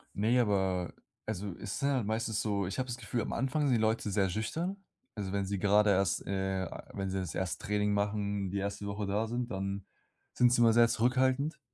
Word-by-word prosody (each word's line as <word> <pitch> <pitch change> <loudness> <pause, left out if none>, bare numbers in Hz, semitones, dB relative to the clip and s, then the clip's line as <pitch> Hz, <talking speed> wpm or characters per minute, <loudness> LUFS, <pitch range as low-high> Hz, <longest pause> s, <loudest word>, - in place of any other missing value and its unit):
Ne, 115 +5 +3
aber 95 -5 +1 0.3
also, 100 -3 -3
es 105 +3 -4
sind 140 0 +1
halt 130 -6 +1
meistens 110 -1 -1
so 100 -3 0
ich 100 - -4
habe 130 - -1
das 120 0 -4
Gefühl, 120 0 -2
am - - -3
Anfang 135 +4 0
sind 125 - +3
die 110 - +1
Leute 110 -1 +1
sehr 95 -1 +2
schüchtern. 160 - -2 0.4
Also, 100 -3 -4
wenn 100 -1 0
sie 100 0 -2
gerade 105 +1 +4
erst, 95 0 +1
äh 95 -1 -1 0.3
wenn 95 -1 -3
sie 95 0 -1
das 90 -3 -4
1. 95 -3 -3
Training 105 0 +1
machen, 100 -1 -1
die 100 - -2
1. 100 +1 -3
Woche 100 0 -3
da 105 +3 0
sind, 120 +1 -3
dann 100 0 -3 0.5
sind 120 -1 +4
sie 120 - +3
immer 115 -1 +6
sehr 120 0 +6
zurückhaltend. 130 +6 +1
105 Hz, 215 wpm, -31 LUFS, 100-120 Hz, 0.5 s, immer